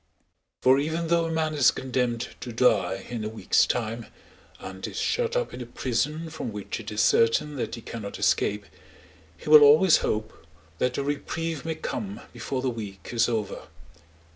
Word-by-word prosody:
For 130 +1 +6
even 160 +3 -2
though 170 -1 +3
a 165 - -3
man 160 -1 0
is 145 -5 +5
condemned 125 -2 -2
to 120 - -6
die 100 -5 +2
in 115 -3 -4
a 105 - -3
week's 110 - +2
time 115 -1 -2 0.5
and - - -7
is - - -8
shut 480 0 0
up - - -1
in - - -7
a 120 - -7
prison 150 +7 -2
from 155 -7 -5
which 105 +1 -5
it 110 -1 -7
is 105 0 0
certain 130 +6 +3
that 125 - -3
he 115 - -9
cannot 110 -3 -7
escape, 105 0 +1 0.7
he - - -13
will 150 0 +9
always 155 +5 +7
hope 110 +1 -3 0.3
that 125 0 0
a 140 - -1
reprieve 155 +2 -3
may 160 -1 -2
come 200 +6 -5
before 130 -1 -4
the 130 - +1
week 100 -6 -8
is 120 0 +2
over. 110 -4 -3
125 Hz, 180 wpm, -26 LUFS, 115-155 Hz, 0.7 s, will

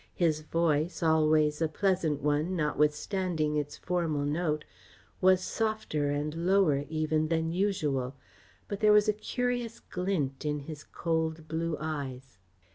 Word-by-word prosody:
His 160 -3 +1
voice, 165 +1 0
always 155 -1 +3
a 160 - +3
pleasant 165 -4 0
one 150 +5 +1
notwithstanding 150 +1 0
its 145 -1 -2
formal 165 -5 -1
note, 155 0 -1 0.6
was 185 0 +5
softer 215 -11 -1
and 145 +1 -1
lower 165 -4 +2
even 155 0 0
than 165 0 0
usual, 150 -9 0 0.5
but 200 - -4
there 215 -1 +5
was 210 0 +5
a 215 - +4
curious 245 +1 -2
glint 175 -8 -2
in 150 -1 -1
his 150 +1 -8
cold 160 -1 -2
blue 160 0 -2
eyes. 135 -7 -5
160 Hz, 130 wpm, -30 LUFS, 150-180 Hz, 0.6 s, was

